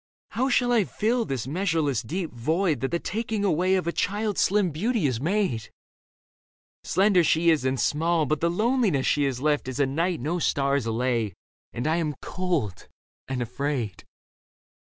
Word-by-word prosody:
How 260 +3 0
shall 245 -1 +2
I 230 -3 +4
fill 230 +5 0
this 130 - -3
measureless 155 - 0
Deep 165 +7 -4
void 160 +8 0
that 135 - -1
the 170 - 0
taking 215 +2 -2
away 185 +1 +2
Of 185 - 0
a 170 - 0
child's 205 +3 -1
slim 200 -3 +2
beauty 210 - 0
has 125 -4 0
made? 170 - 0 1.1
Slender 190 0 +3
she 165 +1 +3
is 150 -5 +1
and 130 0 0
small, 165 +1 +1
but 150 +2 -1
the 170 - +2
loneliness 210 - +1
She 145 -1 +2
has 130 -2 -2
left 150 -2 +1
is 130 +1 -4
a 140 - +4
night 165 +6 -1
no 160 +8 -2
stars 140 -5 +1
allay, 115 -3 -1 0.4
And 120 - -4
I 160 +2 +2
am 155 -4 -1
cold 180 - -3 0.4
and 130 -2 -2
afraid. 125 -3 -3
160 Hz, 170 wpm, -26 LUFS, 135-190 Hz, 1.1 s, I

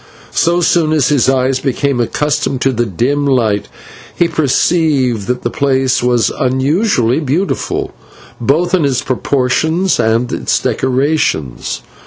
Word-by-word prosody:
So 175 +1 +2
soon 160 -2 +2
as 145 -5 +2
his 140 -4 +2
eyes 130 0 +1
became 135 -1 -1
accustomed 140 +1 -1
to 135 - +2
the 120 -1 -1
dim 130 +9 -1
light, 115 -7 +1 0.5
he 175 - +2
perceived 145 - +1
that 125 0 -2
the 120 - -2
place 130 -2 +1
was 120 -3 +1
unusually 130 - +1
beautiful, 160 +6 -2 0.5
both 160 +9 0
in 180 -4 +3
its 135 -3 0
proportions 140 +8 0
and 115 +2 +1
its - - 0
decorations. 130 - -1
135 Hz, 130 wpm, -14 LUFS, 125-155 Hz, 0.5 s, in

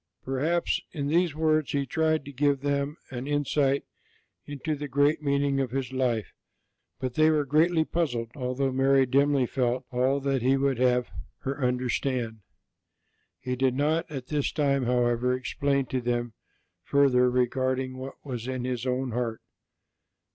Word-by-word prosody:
Perhaps 150 +6 0
in 145 -3 -2
these 170 -1 +2
words 155 -2 +1
He 140 -1 0
tried 155 +2 0
to 140 - -8
give 140 0 +1
them 140 +1 -1
an 125 +1 -5
insight 145 -1 +1 0.6
into 145 +2 -3
the 145 0 -4
great 145 +3 +2
meaning 140 -1 +1
of 135 -2 0
His 130 0 -3
life; 120 -5 -1 0.7
but 130 -1 -3
they 155 +4 +4
were 150 -2 +2 0.4
puzzled, 120 -10 -2
although 130 0 -1
Mary 135 +1 +4
dimly 140 +1 +3
felt 125 0 -1
all 130 +3 +1
that 135 -2 0
He 130 +3 +3
would 135 -2 0
have 125 -1 +2 0.3
her 135 +1 -3
understand. 125 -2 -1 1.0
He 125 0 -3
did 130 0 +1
not 155 +4 0
at 135 -4 -6
this 145 0 -1
time, 140 -3 +1
however, 125 0 +2
explain 140 +1 0
to 130 - 0
them 120 -1 -1 0.5
further 130 -3 +4
regarding 130 +1 0
what 130 +1 -7
was 125 -3 -5
in 130 -1 -3
His 125 0 -3
own 130 0 -1
heart. 115 -1 -3
135 Hz, 150 wpm, -27 LUFS, 125-145 Hz, 1.0 s, they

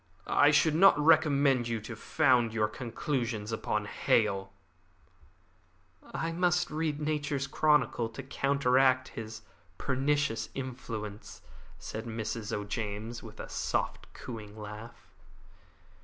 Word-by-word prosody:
I 145 - +5
should 155 +1 +4
not 190 +3 +6
recommend 145 -5 +4
you 115 -1 -1
to 115 +2 -7
found 120 -3 +2
your 105 -1 +2
conclusions 115 -2 -3
upon 105 -1 -1
Hale." 100 -2 +1 1.6
"I 165 - -2
must 175 0 +1
read 155 -1 -1
Nature's 150 -2 -1
Chronicle 145 -7 +2
to 115 +4 -8
counteract 130 -1 +2
his 110 0 -8 0.3
pernicious 135 -4 0
influence," 115 -5 -6 0.3
said 110 +2 -6
Mrs. 110 0 -4
O'James, 105 +2 -4
with 110 -2 -12
a - - -6
soft, - - -2
cooing 110 -3 -8
laugh. 105 +2 -9
120 Hz, 110 wpm, -30 LUFS, 110-145 Hz, 1.6 s, not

